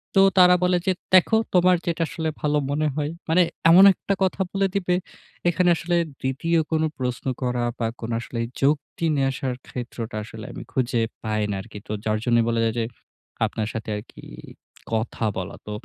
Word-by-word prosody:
তো 195 - +7 0.2
তারা 180 -1 +8
বলে 180 0 +3
যে - - +5 0.2
"দেখো 185 +4 +6 0.2
তোমার 180 0 +5
যেটা 170 -1 0
আসলে 160 -1 -3
ভালো 150 0 +1
মনে 155 +2 +1
হয়।" 150 -1 -1 0.2
মানে 175 +3 +5 0.3
এমন 180 +3 +9
একটা 200 - -2
কথা 190 0 0
বলে 195 0 +1
দিবে। 180 -2 +1 0.6
এখানে 180 +1 +2
আসলে 175 +1 -1 0.3
২য় 165 +6 0
কোনো 160 0 +2
প্রশ্ন 125 -1 -3 0.2
করা 125 -1 0 0.2
বা 115 - 0
কোনো 115 0 -4
আসলে 120 0 -6 0.2
যুক্তি 145 +3 0
নিয়ে 135 -1 +2
আসার 130 -1 -3
ক্ষেত্রটা 120 -3 -6
আসলে 110 0 -9
আমি - - -7
খুঁজে 120 -2 0 0.2
পাই 110 -1 -1
না - - -1
আরকি। 100 - -11
তো - - -6
যার 110 0 +1
জন্য 120 -1 +3
বলা 115 0 +1
যাই 115 - +2
যে - - +1 0.6
আপনার 110 -1 -3
সাথে 110 0 -5
আরকি 105 - -11 0.7
কথা 110 +1 -2
বলা। 95 +1 -4
তো - - -5
140 Hz, 180 wpm, -24 LUFS, 115-175 Hz, 0.7 s, এমন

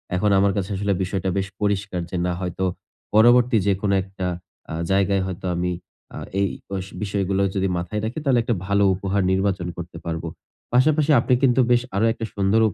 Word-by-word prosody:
এখন 105 +3 +2
আমার 100 0 +3
কাছে 95 -2 -2
আসলে 100 +1 0
বিষয়টা 95 0 -2
বেশ 95 0 -1
পরিষ্কার 100 -2 -1
যে, 90 - -3
না 90 - 0
হয়তো 90 0 -3 0.5
পরবর্তী 120 +2 +5
যেকোনো 100 0 +1
একটা 95 -1 -5 0.4
আ - - -4 0.2
জায়গায় 100 0 +2
হয়তো 95 -1 -6
আমি 90 +1 -1 0.4
আ - - -6 0.2
এই 100 - +3 0.2
বষ 95 -1 -3 0.2
বিষয়গুলো 100 -1 0
যদি 95 0 +1
মাথায় 105 +5 -3
রাখি, 115 +7 -3
তাহলে 130 -4 +3
একটা 120 0 0
ভালো 100 0 +3
উপহার 100 +1 -1
নির্বাচন 95 -1 0
করতে 85 0 -7
পারবো। 80 0 -3 0.5
পাশাপাশি 150 +4 +4
আপনি 130 - +1
কিন্তু 130 -1 +4
বেশ 120 - +5
আরো 105 +3 +2
একটা 115 - -5
সুন্দরও 100 +3 +3
উপ - - -9
100 Hz, 185 wpm, -23 LUFS, 95-110 Hz, 0.5 s, পরবর্তী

